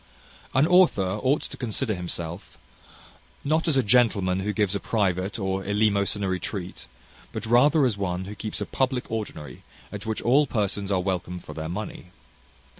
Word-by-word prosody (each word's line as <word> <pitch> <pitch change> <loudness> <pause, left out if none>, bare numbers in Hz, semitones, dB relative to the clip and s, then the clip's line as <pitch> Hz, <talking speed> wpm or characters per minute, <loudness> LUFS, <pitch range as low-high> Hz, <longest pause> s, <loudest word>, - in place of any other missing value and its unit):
An 135 +3 +5
author 130 - +4
ought 140 +3 +2
to - - -7
consider 120 -1 -1
himself, 85 -1 -4 0.9
not 160 +4 +1
as 150 -4 +3
a 130 - +4
gentleman 100 -5 +3
who 100 +2 -1
gives 105 -2 +1
a 100 - 0
private 95 -3 0
or 95 -2 -2
eleemosynary 100 -2 +1
treat, 90 - -5 0.4
but - - -5
rather 135 +6 +5
as 115 -5 0
one 90 -1 -2
who 100 - -7
keeps 105 +1 -4
a 105 - -2
public 130 0 -1
ordinary, 105 -9 -5 0.3
at - - -7
which 110 - -2
all 140 +5 +4
persons 100 -3 -1
are 95 - +2
welcome 90 -1 -2
for - - -9
their 80 0 -5
money. 95 -1 -6
105 Hz, 165 wpm, -25 LUFS, 95-120 Hz, 0.9 s, An